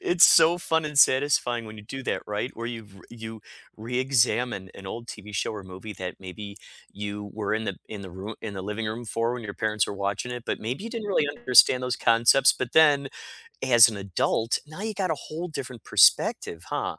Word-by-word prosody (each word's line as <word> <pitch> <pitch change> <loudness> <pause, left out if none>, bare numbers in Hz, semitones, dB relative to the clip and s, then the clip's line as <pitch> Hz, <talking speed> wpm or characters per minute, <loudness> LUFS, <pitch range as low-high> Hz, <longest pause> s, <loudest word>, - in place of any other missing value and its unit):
It's 175 -1 +5
so 170 +2 +6
fun 160 -2 0
and 150 -2 -2
satisfying 130 -4 +3
when 110 0 -10
you 105 - -11
do 135 +5 -8
that, - - -2
right? 105 +4 -3
Where 115 - -6
you've 110 -5 -9
you 110 -1 -9 0.4
reexamine 125 -4 0
an 95 - -11
old 115 +5 -7
TV 105 -1 -9
show 95 - -1
or 105 -2 -7
movie 95 +3 -9
that 90 -1 -6
maybe 100 +2 -9 0.4
you 105 0 -6
were 105 0 -2
in 110 - -2
the - - -4
in 105 -2 -7
the 95 - -9
roo 95 +4 -7
in 105 -2 -6
the 95 - -6
living 105 +2 -4
room 115 +3 -5
for 115 +2 -1
when 120 - -6
your 100 -2 -7
parents 110 -2 0
are - - -5
watching 100 +4 -3
it, 120 -1 -7
but - - -3
maybe 125 - -4
you 230 - -6
didn't 225 -3 -5
really 170 -7 +2
understand 125 0 +5
those 125 -1 -1
concepts, 120 +4 +4
but 125 - -5
then 145 -3 +4 0.6
as 120 -3 +7
an 110 - -7
adult, 100 +4 -1
now 155 +6 -10
you 220 0 -3
got 190 -3 -1
a 160 - 0
whole 160 +5 -7
different 125 -7 -7
perspective, 85 +1 +3
huh? - - -2
115 Hz, 215 wpm, -25 LUFS, 105-130 Hz, 0.6 s, as